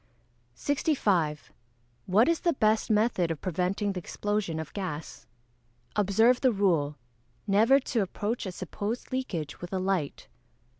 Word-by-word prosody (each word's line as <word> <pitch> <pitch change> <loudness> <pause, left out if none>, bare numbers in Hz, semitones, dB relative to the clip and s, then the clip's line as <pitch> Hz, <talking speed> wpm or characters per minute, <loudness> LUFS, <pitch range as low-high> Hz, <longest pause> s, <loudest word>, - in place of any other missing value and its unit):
65. 195 - 0 0.5
What 210 +7 +4
is 335 -1 +2
the 340 - +1
best 215 -4 +2
method 210 -5 +2
of 165 -3 -3
preventing 185 +3 -1
the 185 - -3
explosion 200 -2 -2
of 160 - -7
gas? 170 -6 -6 0.7
Observe 220 +5 +3
the 260 - +4
rule, 165 -8 +1 0.5
never 225 +7 +5
to 245 -4 -1
approach 205 +3 -2
a - - -3
supposed 205 +6 -5
leakage 175 - -3
with 175 - -7
a 190 - -1
light. 185 -6 -2
200 Hz, 135 wpm, -28 LUFS, 175-225 Hz, 0.7 s, never